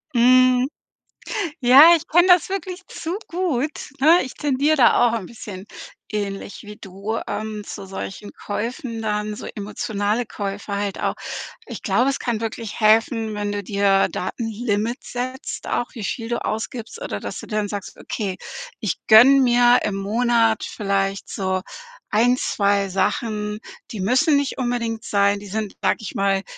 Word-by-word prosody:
Mhm. 255 +1 +5 0.9
Ja, 275 +7 +9
ich 320 - -7
kenne 350 +3 +4
das 360 -3 +6
wirklich 375 -1 -4
zu 335 +4 -5
gut, 315 -5 -2
ne? 320 +6 +6
Ich 260 - -8
tendiere 290 +2 +1
da 240 -2 +5
auch - - -2
'n 190 - -9
bisschen- 200 -4 -9 0.5
ähnlich 200 -1 -4
wie 210 0 -10
du- 200 +3 -5
ähm, 215 -1 -4
zu 195 - -8
solchen 195 +1 -7
Käufen 230 +3 -4
dann, 210 -1 -2
so - - -8
emotionale 210 +2 -2
Käufer 200 -1 -4
halt 200 -1 -3
auch. - - 0 0.5
Ich - - -8
glaube, 260 +3 +2
es 275 - -2
kann 235 -3 -2
wirklich 225 -1 -5
helfen, 220 0 +3
wenn 205 0 -2
du 205 0 -3
dir 200 0 +2
Datenlimits 225 +3 -3
setzt 255 +2 -5
auch, 240 - 0
wie 230 - -7
viel 230 +2 -3
du 235 0 -2
ausgibst 225 - -4
oder - - -4
dass - - -6
du - - -10
dann 210 -2 -2
sagst: 205 -1 -6
„Okay 195 -4 -4 0.4
ich - - -1
gönne 250 +6 +8
mir 245 -1 +5
im 205 - -1
Monat 225 +2 +2
vielleicht 195 -1 -2
so 185 -1 -1 0.5
1, 240 +4 +3
2 200 -4 +1
Sachen, 210 +2 -1 0.3
die 215 - -5
müssen 255 - +3
nicht 280 -1 -1
unbedingt 235 -3 -2
sein.“ 200 -1 +2
Die 205 - -10
sind, 210 +1 -4
sage - - +2
ich 220 - -7
mal, 195 -1 +1
220 Hz, 160 wpm, -22 LUFS, 205-250 Hz, 0.9 s, Ja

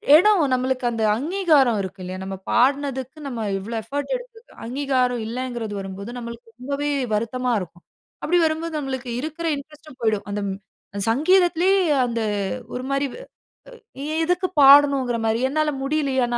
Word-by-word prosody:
இடம். 390 +3 +5
நம்மளுக்கு 255 0 0
அந்த 225 -1 -2
அங்கீகாரம் 300 - +3
இருக்கு 190 0 -7
இல்லையா? 185 +1 -6
நம்ம 195 0 -5
பாடினதுக்கு, 265 +1 +1
நம்ம 240 -4 -4 0.2
இவ்வளோ 220 +5 -6
எஃபோர்ட் 285 - -3
எடுத்ததுக்கு - - -15
அங்கீகாரம் 255 -1 0
இல்லைங்கிறது 240 -2 -4
வரும்போது, 195 +2 -7
நம்மளுக்கு 235 0 -8
ரொம்பவே 280 +3 -2 0.2
வருத்தமா 245 +4 -1
இருக்கும். 175 -1 -10 0.4
அப்படி 355 +3 +2
வரும்போது, 320 +1 -2
நம்மளுக்கு 265 -3 -4
இருக்கிற 315 +3 -4
இன்ட்ரெஸ்டும் 300 0 -13
போயிடும், 210 -3 0
அந்த 205 0 -2
ம் 190 - -4 0.5
சங்கீதத்திலயே 355 +7 +3 0.3
அந்த 235 -1 -2 0.5
ஒரு 250 - -4
மாரி, 275 +1 +1 1.0
எ - - -4 0.2
எதுக்கு 360 +2 +1
பாடணுங்கிற 275 -3 +6
மாரி. 225 +1 +1
என்னால 305 +2 0
முடியலியா? 275 -3 +1
ந - - +2
265 Hz, 140 wpm, -23 LUFS, 230-305 Hz, 1.0 s, பாடணுங்கிற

